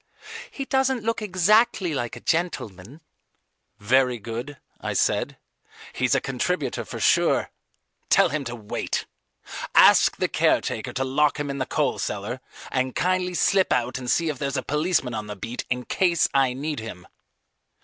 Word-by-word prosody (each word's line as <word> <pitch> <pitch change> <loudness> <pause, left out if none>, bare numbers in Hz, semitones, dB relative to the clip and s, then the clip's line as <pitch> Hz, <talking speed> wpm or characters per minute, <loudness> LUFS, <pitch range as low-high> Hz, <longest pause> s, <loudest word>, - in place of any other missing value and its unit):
"He 275 - -6
doesn't 265 -3 +1
look 230 0 -1
exactly 205 -1 +2
like 120 -3 -3
a 120 - -10
gentleman." 140 - -3 0.8
"Very 125 +4 +2
good," 120 +6 -6 0.2
I - - -3
said. - - 0 0.6
"He's 130 +1 +1
a - - +3
contributor 135 +2 -2
for - - -7
sure. - - +2 0.6
Tell - - +5
him 145 +1 -2
to 120 -1 -5
wait. 105 -3 -3 0.7
Ask - - +6
the - - +1
caretaker - - 0
to 130 - -1
lock 145 +3 +1
him 145 -1 -2
in 140 - -5
the 130 - -2
coal - - 0
cellar, 105 +6 -4 0.3
and 130 -1 -1
kindly 180 0 0
slip 190 +1 +2
out 125 +1 0
and 125 -1 -5
see 165 +4 +2
if 145 -4 -4
there's 140 0 -2
a 130 - -2
policeman 150 -4 0
on 110 -1 -4
the 105 - -6
beat 115 +5 -6
in 125 0 -2
case 175 -3 +2
I 135 -2 +3
need 145 +1 -4
him." 100 -6 -8
135 Hz, 160 wpm, -24 LUFS, 120-175 Hz, 0.8 s, Ask